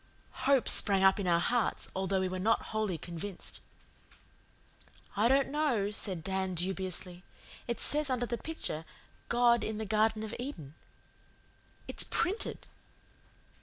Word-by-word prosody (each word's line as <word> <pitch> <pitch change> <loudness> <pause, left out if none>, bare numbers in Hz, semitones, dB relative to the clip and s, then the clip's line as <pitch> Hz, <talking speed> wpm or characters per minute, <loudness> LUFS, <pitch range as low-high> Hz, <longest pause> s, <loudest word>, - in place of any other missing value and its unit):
Hope 275 -3 +4
sprang 195 -2 +6
up 190 +1 +5
in 195 - -2
our 170 -1 +3
hearts, 240 +4 0
although 190 0 0
we 190 - 0
were 185 0 -4
not 220 +4 +1
wholly 215 -5 -1
convinced. 175 +3 -5 1.5
"I 215 +3 +3
don't 270 +2 +3
know," 270 -9 0
said 190 -5 +1
Dan 190 -1 -2
dubiously. 180 0 -3 0.5
"It 235 - -3
says 300 -1 +3
under 250 -2 0
the 235 0 -4
picture 315 - -4 0.5
'God 240 0 +3
in 220 -1 -3
the 220 - -4
Garden 215 +1 +1
of 220 0 -5
Eden.' 165 - -7 1.1
It's - - 0
PRINTED." 385 +6 -2
210 Hz, 135 wpm, -31 LUFS, 185-240 Hz, 1.5 s, sprang